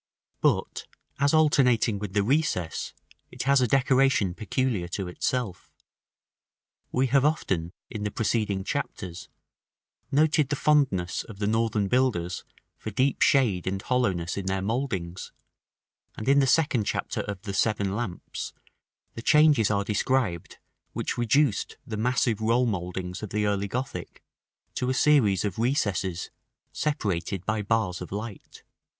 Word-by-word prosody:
§ - - -68
V. - - -56
But, - - 0 0.3
as 140 +1 +3
alternating 125 -9 +3
with 100 -2 -5
the 100 -1 +2
recess, 130 - 0 0.4
it - - -5
has 140 0 +4
a 125 - +3
decoration 135 -6 +3
peculiar 110 -2 -1
to 95 +1 -4
itself. 95 +1 -3 1.2
We 130 +1 +2
have 135 -1 +5
often, 95 - 0 0.2
in 110 - -6
the 105 - -1
preceding 105 -2 -1
chapters, 90 -2 -4 0.8
noted 150 0 +3
the 145 - 0
fondness 135 -13 +1
of 105 - -11
the 100 - -2
Northern 110 -1 +1
builders 100 -8 0 0.4
for - - -5
deep 130 +6 0
shade 110 -11 +3
and 95 +1 -1
hollowness 95 -8 0
in 95 -1 -4
their 95 0 -1
mouldings; 100 -6 -3 0.9
and 110 - -6
in 140 +1 +5
the 135 - +3
second 130 -6 +2
chapter - - -2
of 100 -2 -6
the 100 -3 -4
"Seven 100 -1 +1
Lamps," 105 -6 -5 0.6
the 115 - -7
changes 150 -5 +5
are 100 -1 +1
described 105 -3 -1 0.4
which - - -2
reduced 120 0 +1
the 110 - -5
massive 115 -1 +1
roll 115 +3 +3
mouldings 90 -3 -3
of 105 - -5
the 105 +2 0
early 100 -1 0
Gothic 125 +5 -5 0.5
to 125 - -1
a 130 - 0
series 115 - +3
of 100 0 -3
recesses, 100 - -1 0.4
separated 100 - -2
by 110 -1 0
bars 105 -4 0
of 90 - -7
light. 105 +1 -7
110 Hz, 145 wpm, -26 LUFS, 95-130 Hz, 1.2 s, have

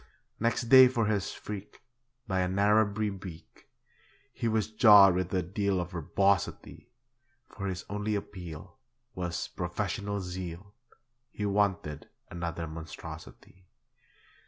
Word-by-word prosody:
Next 115 +2 0
day 130 +2 +9
for 120 -3 0
his 105 -3 -1
freak, 105 -1 -8 0.5
By 95 -2 0
a 90 - +1
Narrabri 105 +2 +2
beak, 90 -4 -11 0.7
He 115 - -2
was 110 -1 0
jawed 105 -4 +8
with 90 0 -2
a 95 -2 0
deal 100 +2 -1
of 90 0 -4
verbosity; 90 +3 -1 0.6
For 100 -1 -6
his 90 -1 -4
only 105 +1 -2
appeal 90 -6 -7 0.4
Was 90 -2 -3
'professional 100 +3 -3
zeal' 90 +1 -7 0.6
He 105 - -4
wanted 100 -7 0 0.2
another 85 -1 -4
monstrosity. 80 +3 -10
95 Hz, 115 wpm, -29 LUFS, 90-105 Hz, 0.7 s, day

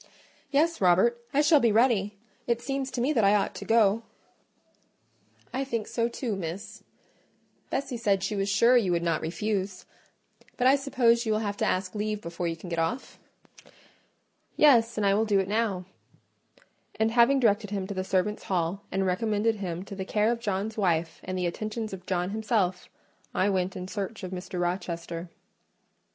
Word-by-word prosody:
"Yes, 320 +2 +1
Robert, 190 +7 +4
I 285 - +3
shall 300 0 +6
be 235 -4 +3
ready: 210 -3 +2 0.3
it 235 -1 +1
seems 270 +1 -3
to 245 - -3
me 275 +5 +2
that 230 -6 +2
I 200 +1 +5
ought 200 - 0
to - - -8
go." 225 -1 +3 1.5
"I 265 - -1
think 230 -5 -3
so 235 0 0
too, 235 -2 -3
Miss. 180 +1 -6 0.9
Bessie 265 -2 -2
said 200 -4 +1
she 210 +2 -1
was 195 0 -1
sure 235 +5 +5
you 215 -7 +3
would 170 0 0
not 165 -2 0
refuse: 190 +2 -3 0.7
but 250 - 0
I 265 +2 +7
suppose 245 -4 +2
you - - +1
will 215 - 0
have 205 0 -2
to - - 0
ask 185 0 -1
leave 210 0 -2
before 170 -2 -4
you 165 - -2
can 170 - -11
get 170 -1 -2
off?" 220 +11 -3 1.4
"Yes; 235 -7 +5
and 210 - +1
I 195 - +4
will 210 +2 +2
do 205 -3 +2
it 190 - -1
now;" 205 -3 -1 1.1
and 220 0 +2
having 240 +4 +5
directed 210 -3 +2
him 195 -2 -3
to 200 - -5
the 185 -1 -2
servants' 190 +2 -1
hall, 180 +1 -1
and 195 +1 0
recommended 215 +3 +1
him 180 -2 -4
to 200 - -9
the 190 - -4
care 210 +3 +1
of 235 - -2
John's 210 0 -2
wife, 170 -5 0
and 185 0 -4
the 180 - -1
attentions 215 +4 -4
of 185 -1 -9
John 180 0 -1
himself, 215 -4 -1 0.5
I 200 +2 +2
went 185 -1 -1
in 180 0 -5
search 205 +1 -5
of 185 - -5
Mr. 185 0 -5
Rochester. 175 -1 -3
205 Hz, 185 wpm, -27 LUFS, 185-230 Hz, 1.5 s, I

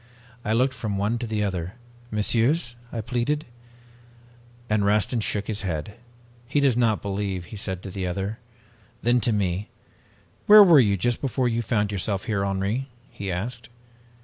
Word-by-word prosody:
"I 110 - -2
looked 130 +3 +2
from 110 -5 -3
one 105 +4 0
to 120 - -4
the 110 -1 -1
other. 90 -3 -3 0.4
'Messieurs,' 120 +5 +1 0.2
I 115 - -3
pleaded, 125 +7 -1 1.2
and 105 -2 +1
Rastin 105 +4 +2
shook 105 -1 -1
his 105 -1 -2
head. 85 +1 -3 0.5
"'He 145 +3 +1
does 140 -4 +3
not 115 -3 +1
believe,' 100 -2 -3
he - - -5
said 95 -2 -4
to 95 - -7
the 95 -1 -3
other. 95 +4 -3 0.6
Then 120 +1 +3
to 115 - +2
me, 100 -1 -1 0.8
'Where 210 0 +11
were 170 -6 +7
you 100 -5 +3
just 120 +6 0
before 130 -2 0
you 115 0 0
found 105 -3 0
yourself 100 0 -1
here, 100 -3 -1
Henri?' 100 +7 -1 0.2
he 100 -2 -5
asked. 115 +6 -4
105 Hz, 165 wpm, -25 LUFS, 100-120 Hz, 1.2 s, Where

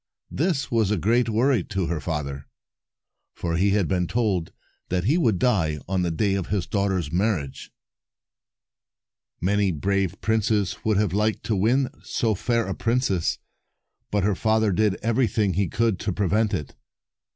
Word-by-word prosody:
This 150 -5 -1
was 115 -4 +2
a 105 - +1
great 115 +6 +2
worry 115 -1 +2
to 95 -4 -2
her 85 -1 -2
father, 70 -4 -4 0.9
for 85 -1 -2
he 95 +4 +2
had 100 -3 +2
been 90 -2 0
told 100 -7 0 0.4
that 90 -1 0
he 130 - +2
would 115 - +2
die 85 -10 +1
on 95 0 0
the 90 - 0
day 95 +5 0
of 95 -3 -2
his 100 -2 -1
daughter's 95 -6 -1
marriage. 90 -7 -1 1.7
Many 100 +2 +1
brave 95 +3 -1
princes 110 -2 0
would 110 -2 +2
have 100 -4 +1
liked 105 +2 0
to 110 - 0
win 125 +7 +2
so 115 -2 0
fair 115 +3 0
a 95 - -3
princess, 115 -8 0 0.7
but 105 -2 0
her 105 +1 +2
father 110 +1 +2
did 100 +1 +2
everything 110 -4 +1
he 95 +2 +1
could 110 +1 0
to 105 - -2
prevent 105 +3 +1
it. 75 - -6
100 Hz, 160 wpm, -24 LUFS, 90-110 Hz, 1.7 s, was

